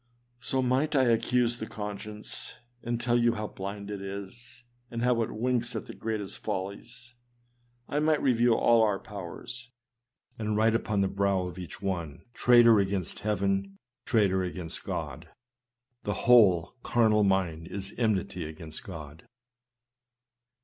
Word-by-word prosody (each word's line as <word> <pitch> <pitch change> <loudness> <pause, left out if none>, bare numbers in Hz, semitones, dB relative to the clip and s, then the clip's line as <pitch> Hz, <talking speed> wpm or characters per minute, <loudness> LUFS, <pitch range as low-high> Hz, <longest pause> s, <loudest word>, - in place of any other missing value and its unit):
So 130 +2 -1
might 135 +5 +1
I 135 - +5
accuse 120 0 +2
the 110 - -4
conscience, 105 0 -5 0.3
and 120 0 -2
tell 120 0 +2
you 120 0 +3
how 105 -2 -3
blind 100 +1 -6
it 100 -1 -5
is, 100 +5 -7 0.3
and 115 0 -3
how 125 -1 +3
it 110 - -1
winks 120 +1 -1
at - - -3
the - - -9
greatest 110 -3 -4
follies. 100 +5 -5 0.7
I 145 - 0
might 155 0 +3
review 120 -3 +3
all 115 -1 +4
our 105 -3 +3
powers, 105 +5 -8 0.7
and 105 -1 -1
write 110 +1 +4
upon 105 -3 0
the 95 - +3
brow 100 -1 +1
of 90 0 -7
each 90 +2 -8
one, 85 -7 -3
" 120 - -37
Traitor 120 -2 +6
against 95 -3 -1
heaven! 100 -1 -1 0.3
traitor 100 -5 +2
against 90 -2 -4
God!" 80 +5 -5 0.7
The 105 - -2
whole 100 -9 +6
" - - -40
carnal 110 -3 +3
mind 90 -5 +1
is 100 +1 -4
enmity 100 -5 0
against 80 0 -7
God." 80 -4 -9
105 Hz, 150 wpm, -29 LUFS, 95-120 Hz, 0.7 s, Traitor